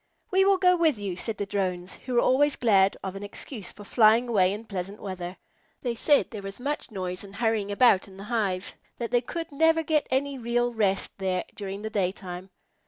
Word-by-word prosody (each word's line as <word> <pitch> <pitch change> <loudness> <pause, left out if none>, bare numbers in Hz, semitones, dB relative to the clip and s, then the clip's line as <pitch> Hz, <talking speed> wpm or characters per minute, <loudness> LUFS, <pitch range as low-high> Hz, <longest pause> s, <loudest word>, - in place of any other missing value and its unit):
"We 385 0 +4
will 395 -1 +5
go 360 -1 +5
with 320 -7 +2
you," 200 -3 -4
said 215 +4 -4
the 205 - -2
Drones, 185 -2 -2
who 250 -1 -6
were 240 - +5
always 290 +3 +3
glad 195 -5 +3
of 190 0 -4
an 195 - -6
excuse 205 0 -7
for 205 - -12
flying 225 +3 +4
away 190 -5 +3
in 210 +3 -5
pleasant 195 0 -5
weather. 185 -2 -6 0.5
They 245 -2 0
said 285 +5 +2
there 215 -3 -6
was 195 0 -6
so 245 - -6
much 295 0 -2
noise 185 -3 -4
and 200 0 -12
hurrying 220 -2 0
around 205 -3 +4
in 190 -1 -14
the 195 - -8
hive 200 -5 -1 0.2
that 235 -1 -4
they 245 - +3
could 330 +6 -5
never 320 +3 +3
get 310 -1 +1
any 270 +1 0
real 240 +1 0
rest 200 -3 0
there 185 -2 0
during 200 0 -6
the 220 - -4
daytime. 185 -2 -3
210 Hz, 215 wpm, -27 LUFS, 195-250 Hz, 0.5 s, will